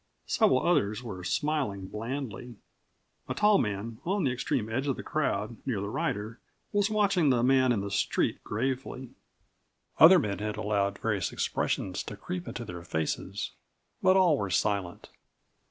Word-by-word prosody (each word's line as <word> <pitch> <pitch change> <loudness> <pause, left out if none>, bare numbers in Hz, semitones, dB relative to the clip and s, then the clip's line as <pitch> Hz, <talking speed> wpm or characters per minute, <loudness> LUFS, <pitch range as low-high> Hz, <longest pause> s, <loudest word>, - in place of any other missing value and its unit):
Several 130 - +3
others 125 -10 +1
were 95 -6 -7
smiling 135 -6 -1
blandly. 120 +2 -5 0.7
A - - -2
tall 210 -1 +4
man 105 +2 -3
on 195 +2 0
the 130 - +2
extreme 125 -2 -1
edge 130 +5 -2
of 135 - +1
the - - -7
crowd, 115 -7 -1
near 125 -7 -1
the 100 +1 -4
rider, 110 +3 -2 0.3
was 205 0 +2
watching 200 -7 +3
the 120 -3 +3
man 130 0 +4
in 110 -5 +1
the 100 0 -5
street - - 0
gravely. 130 +2 -3 0.9
Other 175 +4 +10
men 100 - -1
had 105 0 -3
allowed 100 -2 0
various 105 -5 -1
expressions - - -1
to - - -7
creep 90 -1 -5
into 120 - -5
their 90 -3 -7
faces. 80 -2 -3 0.5
But 185 +1 +5
all 175 -6 +4
were 100 - -2
silent. 95 0 -1
115 Hz, 155 wpm, -29 LUFS, 100-140 Hz, 0.9 s, Other